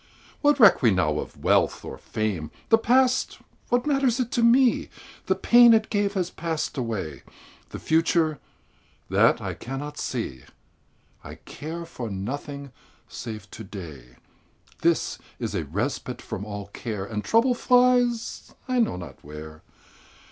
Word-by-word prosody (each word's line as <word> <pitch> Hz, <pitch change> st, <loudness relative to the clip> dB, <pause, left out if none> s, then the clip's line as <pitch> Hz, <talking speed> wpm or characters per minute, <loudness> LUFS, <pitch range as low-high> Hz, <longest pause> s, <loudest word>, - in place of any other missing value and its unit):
What 290 Hz, -1 st, +3 dB
reck 205 Hz, -8 st, +7 dB
we 120 Hz, -, +5 dB
now 80 Hz, -6 st, +1 dB
of -, -, -8 dB
wealth -, -, +2 dB
or -, -, -8 dB
fame? 105 Hz, -9 st, -3 dB, 0.2 s
The 225 Hz, -, +6 dB
past 255 Hz, +3 st, +2 dB, 0.3 s
what 245 Hz, 0 st, +1 dB
matters 275 Hz, -4 st, +2 dB
it 245 Hz, -2 st, -1 dB
to 240 Hz, -, +1 dB
me? 240 Hz, +2 st, +4 dB, 0.4 s
The -, -, +3 dB
pain 240 Hz, -1 st, +7 dB
it 220 Hz, -1 st, 0 dB
gave 205 Hz, -1 st, 0 dB
has 180 Hz, -2 st, -1 dB
passed 165 Hz, -2 st, -3 dB
away. 100 Hz, -, -4 dB, 0.5 s
The -, -, -7 dB
future 160 Hz, -2 st, +1 dB, 0.7 s
that -, -, +4 dB
I -, -, -3 dB
cannot 145 Hz, +4 st, -6 dB
see! 90 Hz, -, -4 dB, 0.8 s
I -, -, -9 dB
care 165 Hz, +3 st, -7 dB
for 125 Hz, -8 st, -6 dB
nothing 140 Hz, +7 st, -5 dB, 0.4 s
save 110 Hz, -4 st, -7 dB
to 110 Hz, -, -8 dB
day 75 Hz, -, -10 dB, 0.7 s
This -, -, +1 dB, 0.2 s
is -, -, -4 dB
a 80 Hz, -, -2 dB
respite 120 Hz, -, -3 dB
from 100 Hz, 0 st, -6 dB
all 100 Hz, -1 st, -6 dB
care, 105 Hz, -2 st, -5 dB
And 105 Hz, 0 st, -4 dB
trouble 235 Hz, +3 st, +3 dB
flies 245 Hz, -1 st, +2 dB
I 255 Hz, -1 st, +1 dB
know 230 Hz, -, +2 dB
not 85 Hz, -7 st, -10 dB
where. 75 Hz, +1 st, -10 dB
145 Hz, 145 wpm, -25 LUFS, -, 0.8 s, reck